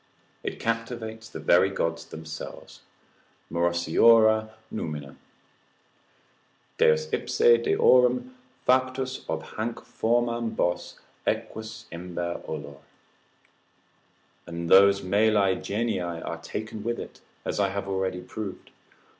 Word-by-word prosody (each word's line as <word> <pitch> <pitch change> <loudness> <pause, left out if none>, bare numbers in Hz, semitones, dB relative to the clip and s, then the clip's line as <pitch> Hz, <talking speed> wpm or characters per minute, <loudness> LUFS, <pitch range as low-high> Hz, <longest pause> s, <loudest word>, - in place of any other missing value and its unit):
It - - -5
captivates 115 -1 -3
the - - -7
very 90 +2 +4
gods 85 -3 -2
themselves, 80 -1 -9 0.7
Morosiora 110 +7 +4 0.2
numina, 75 -8 -5 1.6
———Deus 80 0 +4
ipse 120 0 +4
deorum 125 0 +4 0.4
Factus 130 0 +1
ob 80 0 -2
hanc 115 +2 -2
formam 120 0 0
bos, 90 0 -1 0.3
equus 110 0 -3
imber 85 0 -4
olor. 70 -1 -6 1.7
And 85 0 -5
those 100 +1 +7
mali 100 0 +3
genii 110 -1 -1
are 85 -1 -4
taken 110 +3 -6
with 120 +1 -1
it, - - -9 0.2
as - - -2
I 100 -1 +3
have 100 0 -4
already 95 -1 -1
proved. 100 +1 -7
100 Hz, 100 wpm, -26 LUFS, 85-115 Hz, 1.7 s, those